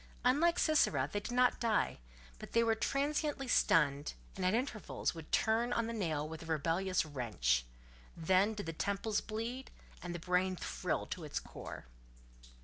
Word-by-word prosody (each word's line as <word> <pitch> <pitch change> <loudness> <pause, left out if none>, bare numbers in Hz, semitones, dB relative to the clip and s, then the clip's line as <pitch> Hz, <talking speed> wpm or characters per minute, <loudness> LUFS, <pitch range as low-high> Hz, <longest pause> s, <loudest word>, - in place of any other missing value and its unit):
Unlike 330 +7 +4
Sisera, 155 - +3
they 205 - +1
did 210 - -6
not 250 0 +3
die: 225 -3 +1 0.4
they 230 - +1
were 225 -1 +3
but 220 - -8
transiently 285 0 0
stunned, 145 - +3 0.2
and 190 - -4
at 185 +3 +3
intervals 240 -4 -2
would 165 -2 -10
turn 230 +2 +2
on 230 -1 +1
the 230 - -3
nail 160 -8 -1
with 160 0 -7
a 165 - -9
rebellious 165 +4 +1
wrench: 105 - 0 0.5
then 190 +6 +3
did 205 - -5
the 165 - -4
temples 200 +5 -1
bleed, 230 +4 -5 0.3
and 175 -1 -5
the - - -2
brain 180 +2 +1
thrill - - -2
to - - -6
its - - -3
core. - - -9
200 Hz, 165 wpm, -34 LUFS, 165-235 Hz, 0.5 s, Unlike